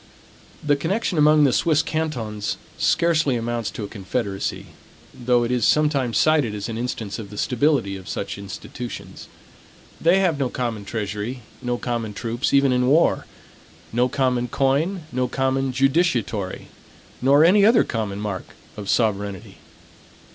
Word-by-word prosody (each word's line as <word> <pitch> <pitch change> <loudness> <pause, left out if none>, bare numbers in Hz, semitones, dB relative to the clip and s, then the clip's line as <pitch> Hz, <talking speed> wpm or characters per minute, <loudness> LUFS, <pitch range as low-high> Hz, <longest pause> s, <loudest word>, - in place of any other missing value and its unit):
The 145 -1 +3
connection 180 +3 -1
among 150 0 +6
the 135 -3 +4
Swiss 160 -2 +2
cantons 120 -10 -3 0.2
scarcely 165 -5 +2
amounts 120 -1 -2
to 110 - -6
a - - -4
confederacy; 100 0 -3 0.5
though 120 -1 +1
it 120 - -1
is 125 -2 0
sometimes 140 -5 +2
cited 150 -9 +3
as 100 -1 -4
an 115 - -4
instance 115 -3 -4
of 105 -3 -8
the 105 - -10
stability 125 -5 +1
of 90 -3 -11
such 100 +3 -4
institutions. 105 +4 -8 0.7
They 170 +3 +4
have 175 -6 +1
no 135 -3 0
common 115 -5 -3
treasury; 110 +3 -4 0.2
no 125 0 -1
common 115 -4 -3
troops 120 +4 -2
even 140 -1 +4
in 125 0 +2
war; 155 +6 +3 0.7
no 125 +2 +2
common 125 -3 0
coin; 145 - 0
no 125 0 0
common 135 0 0
judicatory; 130 - 0 0.5
nor 140 +4 +5
any 200 +4 +5
other 225 +3 +6
common 105 -4 -3
mark 105 -3 -5 0.2
of 100 -2 -7
sovereignty. 100 -4 -1
125 Hz, 145 wpm, -22 LUFS, 110-145 Hz, 0.7 s, among